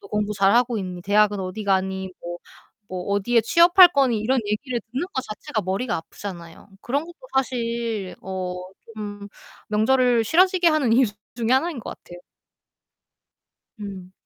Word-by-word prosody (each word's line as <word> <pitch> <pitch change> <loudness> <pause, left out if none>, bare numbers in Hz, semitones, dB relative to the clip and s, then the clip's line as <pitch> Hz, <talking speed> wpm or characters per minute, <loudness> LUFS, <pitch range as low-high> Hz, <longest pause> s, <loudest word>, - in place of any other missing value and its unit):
"너 200 - -13
공부 210 0 -1
잘하고 230 +4 +3
있니? 180 -2 -6
대학은 205 +1 +3
어디 185 +3 -5
가니?" 190 -1 0
뭐 175 0 -6 0.5
뭐 180 -1 -5
"어디에 230 +4 +2
취업할 345 - +7
거니?" 270 -8 +2
이런 250 +4 +1
얘기를 240 +4 -2
듣는 270 +8 -2
거 260 - -1
자체가 215 -1 -4
머리가 195 +6 -2
아프잖아요. 170 +1 -9
그런 280 +5 -1
것도 345 +1 -13 0.2
사실 235 -6 -2
어 185 -1 -4 0.4
좀 205 -1 -7 0.4
명절을 235 +2 +3
싫어지게 365 - +3
하는 300 -7 +2
이유 250 +1 +5 0.3
중에 230 -2 -2
하나인 280 +2 +1
것 - - -7
같아요. 175 0 -12 1.6
음. 190 -3 -8
215 Hz, 305 characters per minute, -23 LUFS, 195-255 Hz, 1.6 s, 취업할